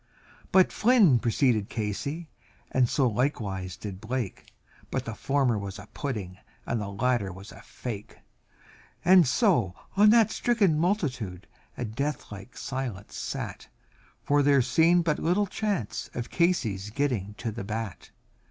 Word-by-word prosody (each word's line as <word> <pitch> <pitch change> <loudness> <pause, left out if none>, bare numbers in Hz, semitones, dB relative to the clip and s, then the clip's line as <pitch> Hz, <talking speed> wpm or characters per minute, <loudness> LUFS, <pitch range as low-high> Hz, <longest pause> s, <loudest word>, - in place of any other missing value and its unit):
But 190 -1 +5
Flynn 215 - +5
preceded 115 -2 +1
Casey, 140 +10 -3 0.4
and 125 -2 +2
likewise 110 -8 0
so - - -25
did 100 -2 -6
Blake, 120 -3 -4 0.4
And - - 0
the 115 - -5
former 130 -2 +1
was 100 -1 -6
a 100 - -10
pudding 100 -10 -4 0.3
and 115 -2 -1
the 100 - -4
latter 105 -1 0
was 95 +3 -11
a - - -12
fake; 110 -5 -7 1.1
So 125 - +2 0.2
on 210 +2 +7
that 225 -1 +5
stricken 200 -10 +2
multitude 125 - -1 0.3
a 125 - -2
death 140 +7 -3
like 100 +4 -10
silence 125 -7 -5
sat, - - -5 0.6
For 145 0 +3
there 140 -2 +4
seemed 170 +6 +4
but 160 -2 0
little 180 +5 +2
chance 200 - -3
of 120 - -4
Casey's 115 - +1
getting 110 -5 -1
to 115 0 -4
the 110 -1 -6
bat. 110 -1 -5
125 Hz, 140 wpm, -27 LUFS, 105-155 Hz, 1.1 s, on